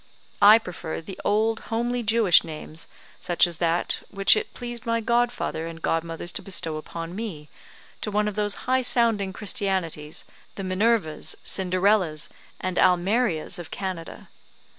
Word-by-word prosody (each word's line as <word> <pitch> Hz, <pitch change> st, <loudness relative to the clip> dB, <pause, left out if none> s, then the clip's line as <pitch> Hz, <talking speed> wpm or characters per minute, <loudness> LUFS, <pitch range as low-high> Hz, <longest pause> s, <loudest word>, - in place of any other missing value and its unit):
I 210 Hz, +2 st, +9 dB
prefer 180 Hz, -6 st, -6 dB
the 185 Hz, +4 st, -9 dB
old 220 Hz, +2 st, +2 dB
homely 240 Hz, +2 st, -1 dB
Jewish 220 Hz, -5 st, +5 dB
names, 155 Hz, 0 st, -8 dB, 0.3 s
such 175 Hz, +1 st, +3 dB
as 170 Hz, -2 st, -6 dB
that 170 Hz, 0 st, 0 dB
which 195 Hz, 0 st, +5 dB
it -, -, -3 dB
pleased 240 Hz, -1 st, -6 dB
my 230 Hz, 0 st, +1 dB
godfather 235 Hz, -7 st, 0 dB
and 165 Hz, 0 st, -8 dB
godmothers 165 Hz, +1 st, -1 dB
to -, -, -4 dB
bestow 175 Hz, -5 st, -2 dB
upon 165 Hz, +2 st, -7 dB
me, 180 Hz, -9 st, -6 dB, 0.5 s
to -, -, -2 dB
one 210 Hz, 0 st, +1 dB
of 210 Hz, -, -2 dB
those 205 Hz, 0 st, 0 dB
high 260 Hz, +1 st, +2 dB
sounding 230 Hz, -6 st, +2 dB
christianities, 190 Hz, -8 st, -3 dB, 0.3 s
the 195 Hz, -, -5 dB
Minervas, 185 Hz, -4 st, +1 dB
Cinderellas, 185 Hz, -4 st, +1 dB, 0.3 s
and 185 Hz, -1 st, -2 dB
Almerias 180 Hz, -1 st, +2 dB
of 175 Hz, -, -8 dB
Canada. 185 Hz, -4 st, -6 dB
190 Hz, 140 wpm, -25 LUFS, 165-225 Hz, 0.5 s, I